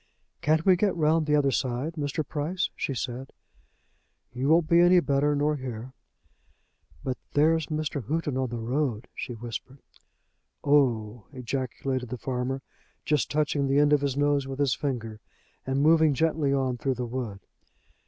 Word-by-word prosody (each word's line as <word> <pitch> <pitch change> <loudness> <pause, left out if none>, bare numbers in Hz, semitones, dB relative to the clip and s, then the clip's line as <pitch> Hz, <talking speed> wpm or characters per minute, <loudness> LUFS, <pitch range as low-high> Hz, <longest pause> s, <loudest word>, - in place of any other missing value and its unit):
"Can't 155 +2 +2
we 190 -2 +6
get 195 +2 +1
round 160 -1 +2
the 150 - +3
other 140 -2 +3
side, 130 +5 -1
Mr. 150 -1 -3
Price?" 165 +5 -2
she 135 - -3
said. 130 +2 -4 1.0
"You 130 +3 -1
won't 165 0 +4
be 170 +1 +5
any 175 +1 +6
better 145 -2 +1
nor 150 +1 +1
here." 130 -1 -6 1.1
"But 130 -1 -3
there's 155 +1 +3
Mr. 155 -5 -3
Houghton 155 -3 -1
on 130 -1 -1
the 120 - -4
road," 120 0 -1
she 125 - -5
whispered. 120 +3 -7 0.9
"Oh 120 -7 +2
h - - -19
h," - - -7
ejaculated 130 0 -3
the 125 - -4
farmer, 130 +1 -3 0.4
just 150 -3 +1
touching 145 -2 0
the 135 +1 +2
end 145 0 +5
of 145 - +4
his 140 -1 -1
nose 145 -1 +2
with 135 -1 -5
his 140 -3 +2
finger 115 -6 -3 0.5
and 135 +1 +1
moving 160 -2 +5
gently 155 -1 +1
on 130 -2 0
through 135 +1 0
the 125 0 -3
wood. 115 -5 -4
140 Hz, 165 wpm, -27 LUFS, 125-150 Hz, 1.1 s, we